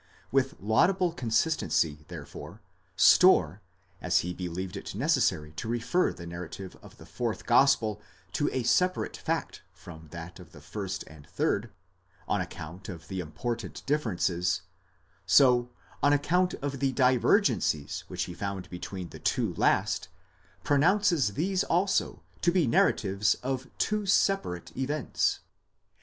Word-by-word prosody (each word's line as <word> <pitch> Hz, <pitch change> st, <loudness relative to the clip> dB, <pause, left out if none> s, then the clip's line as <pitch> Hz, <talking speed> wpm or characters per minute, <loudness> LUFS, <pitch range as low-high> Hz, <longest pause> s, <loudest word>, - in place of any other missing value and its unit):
With -, -, +1 dB
laudable 175 Hz, -, +2 dB
consistency, 110 Hz, -, 0 dB
therefore, -, -, -9 dB, 0.4 s
Storr, -, -, +5 dB, 0.4 s
as -, -, +2 dB
he 90 Hz, +1 st, -4 dB
believed 90 Hz, +2 st, -5 dB
it 100 Hz, -, -7 dB
necessary 110 Hz, -, +1 dB
to -, -, -4 dB
refer 120 Hz, +10 st, +1 dB
the 85 Hz, -, -10 dB
narrative 85 Hz, +2 st, -7 dB
of -, -, -15 dB
the -, -, -13 dB
fourth 120 Hz, -3 st, -4 dB
gospel 120 Hz, -4 st, +3 dB, 0.3 s
to 145 Hz, -, 0 dB
a 130 Hz, -, -1 dB
separate 180 Hz, +10 st, +1 dB
fact -, -, -3 dB
from 85 Hz, -3 st, -12 dB
that 85 Hz, +3 st, -9 dB
of 90 Hz, -, -14 dB
the 75 Hz, -, -12 dB
first 100 Hz, +5 st, -5 dB
and 75 Hz, 0 st, -15 dB
third, 100 Hz, +6 st, -1 dB, 0.6 s
on 100 Hz, -, +1 dB
account 90 Hz, +1 st, -8 dB
of 80 Hz, -4 st, -9 dB
the 95 Hz, -, -4 dB
important 100 Hz, +8 st, -5 dB
differences; 90 Hz, -, 0 dB, 0.6 s
so, 125 Hz, -3 st, +5 dB, 0.3 s
on 145 Hz, -, +4 dB
account 175 Hz, +6 st, +2 dB
of 140 Hz, -2 st, -3 dB
the 135 Hz, -1 st, +1 dB
divergencies 125 Hz, -, +2 dB
which -, -, -3 dB
he 90 Hz, -, -6 dB
found 100 Hz, 0 st, -5 dB
between 90 Hz, 0 st, -6 dB
the -, -, -11 dB
two -, -, 0 dB
last, -, -, +1 dB, 0.6 s
pronounces 155 Hz, -, +3 dB
these 185 Hz, +3 st, 0 dB
also 185 Hz, +3 st, 0 dB, 0.2 s
to 175 Hz, -, +3 dB
be 175 Hz, -3 st, +3 dB
narratives 105 Hz, -3 st, +2 dB
of 130 Hz, 0 st, -2 dB
two 210 Hz, -2 st, 0 dB
separate 195 Hz, -, +1 dB
events. 140 Hz, +1 st, -1 dB
110 Hz, 135 wpm, -28 LUFS, 90-145 Hz, 0.6 s, Storr